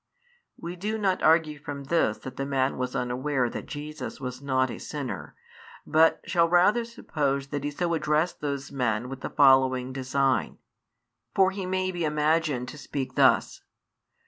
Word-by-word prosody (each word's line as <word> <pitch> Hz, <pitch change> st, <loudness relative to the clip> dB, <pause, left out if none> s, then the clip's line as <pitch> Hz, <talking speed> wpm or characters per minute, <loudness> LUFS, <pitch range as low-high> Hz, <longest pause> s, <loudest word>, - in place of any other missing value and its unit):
We 170 Hz, +1 st, -6 dB
do 210 Hz, +5 st, -3 dB
not 195 Hz, -3 st, 0 dB
argue 155 Hz, -2 st, +3 dB
from 145 Hz, -1 st, -6 dB
this 140 Hz, -7 st, +1 dB
that 130 Hz, -1 st, -9 dB
the 135 Hz, -, -3 dB
man 135 Hz, -1 st, 0 dB
was 125 Hz, 0 st, -3 dB
unaware 125 Hz, 0 st, -1 dB
that -, -, -6 dB
Jesus 150 Hz, +1 st, -6 dB
was 125 Hz, -1 st, -6 dB
not 130 Hz, -2 st, +1 dB
a -, -, -7 dB
sinner, 145 Hz, -4 st, -6 dB, 0.5 s
but 160 Hz, +1 st, +4 dB
shall 170 Hz, -1 st, +2 dB
rather 185 Hz, +7 st, +4 dB
suppose 140 Hz, -11 st, -2 dB
that 145 Hz, -1 st, -3 dB
he 145 Hz, -, -1 dB
so 170 Hz, +4 st, -1 dB
addressed 155 Hz, +1 st, 0 dB
those 140 Hz, -2 st, -3 dB
men 125 Hz, -3 st, -1 dB
with 135 Hz, -1 st, -7 dB
the -, -, -4 dB
following 130 Hz, -2 st, +4 dB
design. 135 Hz, 0 st, 0 dB, 0.8 s
For 190 Hz, -1 st, +4 dB
he 195 Hz, -1 st, -5 dB
may 185 Hz, 0 st, 0 dB
be 175 Hz, -2 st, -3 dB
imagined 150 Hz, -3 st, +1 dB
to 150 Hz, -, -10 dB
speak 135 Hz, -1 st, -4 dB
thus. -, -, +3 dB
145 Hz, 165 wpm, -27 LUFS, 130-165 Hz, 0.8 s, but